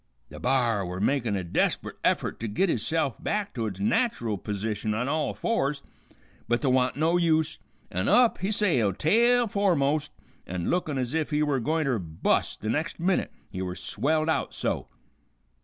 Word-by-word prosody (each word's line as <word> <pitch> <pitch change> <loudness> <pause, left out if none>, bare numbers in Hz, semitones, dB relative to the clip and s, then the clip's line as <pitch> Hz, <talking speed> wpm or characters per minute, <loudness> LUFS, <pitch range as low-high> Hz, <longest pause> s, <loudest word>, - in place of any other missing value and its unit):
The - - -10
b'ar 120 -5 +1
were 90 0 -5
making 115 -2 +1
a 95 - -3
desper't 85 - -1
effort - - 0
to 115 - -3
git 170 - +1
itself 135 +3 -1
back 205 -1 -1
to 115 -3 -2
its 95 -2 -6
nat'ral 110 - 0
p'sition 105 +1 -2
on 125 +3 -1
all 155 +2 -1
fours, 145 -11 -1 0.6
but 120 +4 0
th' 135 - +3
wa'n't 125 0 +2
no 165 +3 +3
use, 160 -2 +1 0.3
an' 95 +3 -1
up 245 -2 +5
he 190 - -1
sailed, 135 - +2
tail 235 +8 +4
foremost, 165 -9 +1 0.4
an' 90 -1 -2
lookin' 160 -5 0
ez 125 0 -2
if 160 -1 0
he 150 0 +1
were 145 -3 +1
gointer 145 -2 0
bust 80 -3 -1
the 110 - -3
next 155 +9 -2
minute, 180 +2 +1 0.2
he 95 - -4
were 90 -1 -3
swelled 155 +12 0
out 160 - 0
so. - - -2
140 Hz, 175 wpm, -27 LUFS, 110-160 Hz, 0.6 s, up